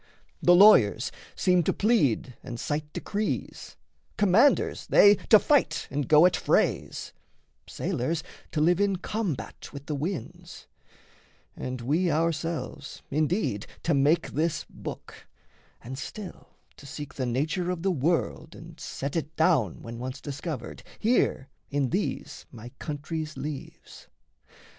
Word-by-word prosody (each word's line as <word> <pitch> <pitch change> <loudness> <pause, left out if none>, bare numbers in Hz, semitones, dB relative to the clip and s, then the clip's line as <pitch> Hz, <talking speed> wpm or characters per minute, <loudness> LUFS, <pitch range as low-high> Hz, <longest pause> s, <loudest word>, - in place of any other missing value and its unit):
The 175 - +6
lawyers 140 - +6 0.2
seem 180 -1 +3
to 160 - +1
plead 150 - +1
and 120 -2 -7
cite 150 0 -3
decrees, 210 +6 -4 0.4
Commanders 210 +8 +3
they 205 0 +7 0.2
to 215 - +10
fight 290 +5 +2
and 140 0 -2
go 155 +2 +7
at 180 -2 +4
frays, - - 0 0.5
Sailors 160 +7 -2 0.3
to 150 - -1
live 175 +3 +3
in 200 -1 +2
combat 190 - -4
with 140 0 -9
the 150 - -3
winds, 155 +4 -5 0.9
And 125 -1 -5
we 160 +9 +1
ourselves 165 -2 -2
indeed 155 - 0 0.2
to 170 - +2
make 145 +4 +2
this 160 +1 -1
book, - - -9 0.6
And 130 +3 -7
still 200 +1 -9 0.2
to 140 - -12
seek 145 0 -7
the 130 -2 -3
nature 155 +9 -1
of 180 -2 -3
the 195 - +2
world 160 +1 -1
And 165 0 -12
set 140 +3 -5
it 160 -2 -3
down, 160 - +2
when 115 0 -7
once 130 +2 -5
discovered, 145 -3 -6 0.2
here 220 - +1 0.2
In 140 -2 0
these 195 +4 -3
my 120 -1 -10
country's 155 +1 -5
leaves. 150 -2 -8
155 Hz, 130 wpm, -27 LUFS, 140-180 Hz, 0.9 s, to